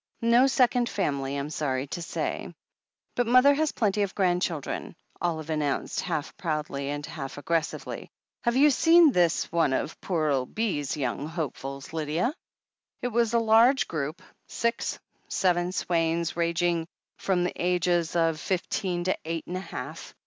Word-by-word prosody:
No 235 Hz, +3 st, +5 dB
second 245 Hz, -2 st, +3 dB
family, 140 Hz, -7 st, -1 dB
I'm 140 Hz, +2 st, -4 dB
sorry 135 Hz, -4 st, -1 dB
to 160 Hz, +4 st, -5 dB
say.*' 170 Hz, -, -3 dB, 0.6 s
"But 245 Hz, -1 st, 0 dB
mother 255 Hz, +4 st, +6 dB
has 310 Hz, +1 st, +1 dB
plenty 210 Hz, -2 st, +1 dB
of 200 Hz, -1 st, -1 dB
grandchildren," 175 Hz, -5 st, -1 dB, 0.3 s
Olive 160 Hz, -2 st, -2 dB
announced, 150 Hz, -3 st, -1 dB
half 150 Hz, 0 st, -3 dB
proudly 150 Hz, -6 st, -2 dB
and 145 Hz, 0 st, -3 dB
half 135 Hz, -4 st, -7 dB
aggressively. 165 Hz, +2 st, -2 dB, 0.3 s
"Have 235 Hz, 0 st, +1 dB
you 290 Hz, +3 st, +6 dB
seen 325 Hz, +3 st, +6 dB
this 175 Hz, -6 st, +2 dB
one 165 Hz, -5 st, +2 dB
of 150 Hz, -, -2 dB
pore 160 Hz, -5 st, 0 dB
ole 130 Hz, -2 st, 0 dB
Bee's 170 Hz, -12 st, -2 dB
young 140 Hz, +1 st, -2 dB
hopefuls, 140 Hz, -4 st, -5 dB
Lydia?" 160 Hz, -, 0 dB, 0.7 s
It 245 Hz, -, 0 dB
was 235 Hz, 0 st, +1 dB
a -, -, +5 dB
large 230 Hz, +4 st, +5 dB
group. 155 Hz, 0 st, -4 dB, 0.2 s
Six 235 Hz, 0 st, -1 dB, 0.2 s
— -, -, -41 dB
seven, 175 Hz, -1 st, +1 dB
Swaines, 170 Hz, -2 st, 0 dB
rang 170 Hz, 0 st, 0 dB
ing 170 Hz, -2 st, +1 dB, 0.3 s
from 185 Hz, -2 st, +1 dB
the 180 Hz, -, -1 dB
ages 175 Hz, -1 st, +1 dB
of 165 Hz, -2 st, +2 dB
fifteen 180 Hz, -1 st, -1 dB
to 185 Hz, -, +1 dB
eight 165 Hz, 0 st, -4 dB
and 180 Hz, -, -5 dB
a -, -, -2 dB
half. 160 Hz, -3 st, -7 dB
170 Hz, 155 wpm, -27 LUFS, 150-210 Hz, 0.7 s, mother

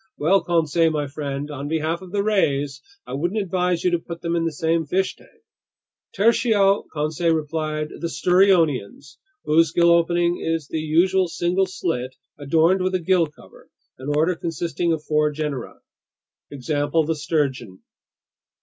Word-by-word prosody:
Well, 185 Hz, +6 st, +3 dB
Conseil 165 Hz, -1 st, +2 dB
my 150 Hz, -2 st, -1 dB
friend, 145 Hz, 0 st, -5 dB
on 145 Hz, 0 st, -5 dB
behalf 160 Hz, +2 st, -1 dB
of 185 Hz, -2 st, -11 dB
the 200 Hz, 0 st, 0 dB
rays, 145 Hz, -9 st, 0 dB, 0.2 s
I 125 Hz, -, -8 dB
wouldn't 175 Hz, +10 st, -1 dB
advise 180 Hz, -3 st, -1 dB
you 180 Hz, -, +2 dB
to 175 Hz, -, +1 dB
put 170 Hz, 0 st, -9 dB
them 170 Hz, 0 st, -1 dB
in 165 Hz, -1 st, 0 dB
the 165 Hz, -, -1 dB
same 160 Hz, +1 st, -1 dB
fish 190 Hz, +5 st, 0 dB
tank!" -, -, -23 dB, 0.7 s
"Tertio," 205 Hz, -2 st, +3 dB
Conseil 160 Hz, +2 st, 0 dB
replied, 155 Hz, 0 st, -3 dB
"The 170 Hz, -, -5 dB
sturionians, 165 Hz, -, +1 dB, 0.3 s
whose 160 Hz, +1 st, +3 dB
gill 170 Hz, 0 st, +4 dB
opening 170 Hz, +1 st, +2 dB
is 165 Hz, -3 st, -2 dB
the 160 Hz, -, -3 dB
usual 180 Hz, +4 st, +2 dB
single 175 Hz, +3 st, 0 dB
slit 130 Hz, -9 st, -3 dB, 0.2 s
adorned 165 Hz, +6 st, +2 dB
with 185 Hz, 0 st, 0 dB
a -, -, +1 dB
gill 175 Hz, -1 st, +2 dB
cover, 150 Hz, -, -18 dB, 0.3 s
an 130 Hz, +2 st, -6 dB
order 165 Hz, +4 st, +2 dB
consisting 170 Hz, +1 st, -2 dB
of 160 Hz, -2 st, -2 dB
four 150 Hz, 0 st, +1 dB
genera. 150 Hz, -4 st, -5 dB, 0.7 s
Example: 145 Hz, +3 st, -1 dB
the 160 Hz, +1 st, -1 dB
sturgeon." 135 Hz, -, -2 dB
165 Hz, 155 wpm, -22 LUFS, 150-175 Hz, 0.7 s, gill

